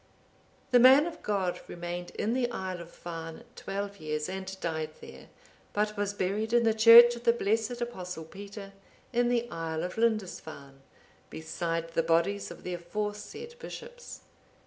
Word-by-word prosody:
The 245 - +7
man 265 +4 +8
of 340 -1 -6
God 190 -4 -1
remained 175 0 -5
in 220 - 0
the 245 -1 +1
isle 185 -6 -4
of 170 - -10
Farne 165 -2 -8
twelve 200 0 -5
years, 155 -2 -3
and 190 0 -6
died 160 -3 -2
there; - - -12 0.5
but 210 +1 0
was 205 0 -2
buried 210 +4 -1
in 240 0 +5
the 225 -1 +3
church 230 +2 +9
of 235 - -9
the 235 - +6
blessed 225 +1 0
Apostle 180 -8 -5
Peter, 200 +3 -9 0.4
in 240 0 +2
the 240 -1 +1
isle 160 -1 -3
of 180 +5 -4
Lindisfarne, 165 -11 -2 0.5
beside 165 +1 -3
the 165 - +2
bodies 170 +5 +1
of - - -11
the 180 - -4
aforesaid 210 - -5
bishops. - - -9
200 Hz, 155 wpm, -29 LUFS, 170-230 Hz, 0.5 s, church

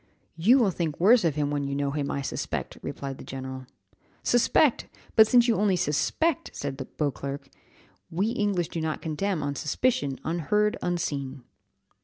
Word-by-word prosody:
"You 205 +11 +5
will 225 -7 +3
think 165 -4 -3
worse 220 +6 +6
of 160 -4 +1
him 145 -1 0
when 145 -1 -1
you 140 0 -2
know 140 0 -1
him, 145 -1 -2
I 140 - -2
suspect," - - -4
replied 135 -1 -6
the - - -8
general. 130 -1 -7 0.6
"Suspect! 245 +3 +3 0.3
But 220 -1 +8
since 240 +1 +5
you 230 - +3
only 200 -2 +3
suspect," 180 - 0
said 140 -1 -4 0.2
Beauclerc, 140 -1 -3 0.6
"we 195 +6 0
English 205 -7 0
do 165 - -4
not 160 -1 -3
condemn 160 +1 -1
on 145 0 -1
suspicion, 145 - 0
unheard, 190 +6 +1
unseen." 140 -7 -3
160 Hz, 160 wpm, -27 LUFS, 140-210 Hz, 0.6 s, But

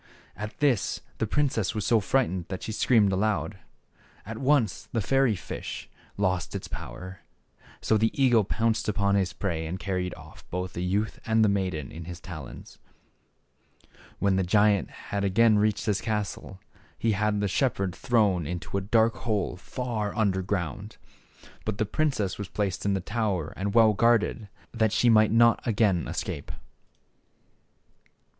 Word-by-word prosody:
At 105 +2 -7
this 140 -8 +1 0.2
the 110 - 0
princess 115 -5 0
was 105 -3 -2
so 115 +1 +4
frightened 100 -5 0
that 95 -1 -6
she - - -4
screamed 110 -2 +3
aloud. 105 0 -1 0.7
At 110 +2 -6
once 130 -6 +1
the 115 - 0
fairy 130 +2 +2
fish 90 - -7 0.3
lost 90 -4 -1
its - - -5
power. 90 +9 -8 0.6
So 110 - +2
the 110 +1 +3
eagle 120 -5 +5
pounced 110 +2 0
upon 100 -1 +1
his 95 -3 +1
prey 80 -5 -3
and 90 +3 -4
carried 90 -2 -3
off 80 -2 -14
both 90 +1 -4
the 85 - -3
youth 100 +4 -1
and 110 -1 +3
maiden 95 -9 -1
in 80 +1 -8
his 85 0 -7
talons. 85 -4 -10 1.4
When 100 -1 +2
the 95 - +2
giant 105 0 +3
had 100 0 -5
again 105 +2 +4
reached 105 0 +1
his 105 -3 0
castle 105 -3 -3 0.4
he 115 - +1
had 105 0 +1
the 105 - +1
shepherd 100 -4 0
thrown 100 -8 +1
into 90 +3 -3
a - - -6
dark 110 +3 +2
hole 105 -5 -1
far 110 +2 -4
under 100 -4 +1
ground. 100 +3 -4 0.7
But 110 -2 -3
the 110 - +1
princess 110 -6 -1
was 105 - -4
placed 100 -1 -2
in 100 - +2
the 95 - -1
tower 100 -6 -2
and 100 +2 -3
well 110 -2 +6
guarded, 115 -1 +2 0.2
that 110 -3 +1
she 120 +1 +4
might 110 -1 +5
not 115 +1 +5
again 100 -7 +1
escape. - - -4
105 Hz, 155 wpm, -27 LUFS, 95-110 Hz, 1.4 s, well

